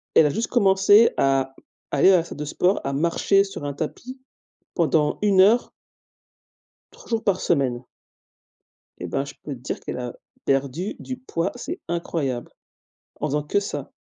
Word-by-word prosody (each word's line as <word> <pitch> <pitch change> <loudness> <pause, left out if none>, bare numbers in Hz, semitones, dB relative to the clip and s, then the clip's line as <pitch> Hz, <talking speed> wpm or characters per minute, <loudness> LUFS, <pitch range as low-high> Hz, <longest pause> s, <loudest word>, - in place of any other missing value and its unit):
Elle 160 - +7
a - - +3
juste 220 +10 -2
commencé 205 0 +5
à, 135 -1 +1 0.4
aller 145 +7 +5
à 185 - +6
la 170 - +1
salle - - -10
de 150 - -4
sport, 180 +6 +1
à 140 - -2
marcher 170 +6 +2
sur 195 -6 -8
un 145 - -3
tapis, 240 - -6 0.5
pendant 155 -3 +1
1 200 -2 +5
heure 220 +6 +4 1.2
3 - - -17
jours 230 -1 -1
par 195 -2 +1
semaine 130 -6 0 1.2
et - - -5
ben 135 +11 -2
je 140 - -9
peux 145 - -5
te 130 - -10
dire 125 - -5
qu'elle - - -6
a 125 -1 -5 0.3
perdu 140 +8 -1
du 255 - -6
poids, 170 -10 -2
c'est 335 +9 -6
incroyable! 155 -7 -3 0.7
En 150 - 0
faisant 150 +1 0
que 150 +7 0
ça. 200 - -5
165 Hz, 170 wpm, -23 LUFS, 140-200 Hz, 1.2 s, Elle